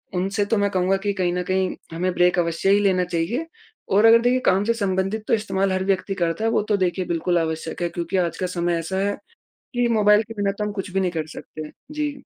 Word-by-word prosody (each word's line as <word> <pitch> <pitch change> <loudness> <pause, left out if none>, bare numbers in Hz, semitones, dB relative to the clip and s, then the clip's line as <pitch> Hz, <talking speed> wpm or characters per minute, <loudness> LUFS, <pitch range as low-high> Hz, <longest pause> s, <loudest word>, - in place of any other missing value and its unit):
उनसे 195 +3 0
तो 215 +2 0
मैं 200 0 +2
कहूँगा 185 +1 +1
कि 200 0 0
कहीं 180 -3 0
न 180 0 -1
कहीं 185 0 0 0.2
हमें 180 +3 -1
ब्रेक 180 0 +3
अवश्य 170 +2 0
ही 200 - +5
लेना 190 -3 +2
चाहिए 180 - -2 0.4
और 205 +3 +4
अगर 230 +1 +7
देखिए 245 +1 +2
काम 190 +2 +3
से 230 - +1
संबंधित 195 0 -1
तो - - +1
इस्तेमाल 195 -3 0
हर 185 0 0
व्यक्ति 195 0 0
करता 170 +6 -1
है 225 - +2
वो - - +2
तो 205 - +3
देखिए 180 +1 -2
बिल्कुल 175 +1 0
आवश्यक 160 +1 -3
है 175 - 0
क्योंकि 170 +2 -3
आज 175 -2 0
का 185 - -2
समय 170 0 +1
ऐसा 165 +3 -4
है 205 - -1 0.6
कि 245 -1 +2
मोबाइल 210 0 +5
के 225 +1 -10
बिना 205 -2 0
तो 210 +1 -4
हम 210 - -3
कुछ 195 -2 -5
भी 195 - +1
नहीं 185 -2 +1
कर 160 -2 -3
सकते 155 - -8
हैं। 150 - -9 0.2
जी। 295 -2 -3
190 Hz, 250 wpm, -23 LUFS, 175-210 Hz, 0.6 s, अगर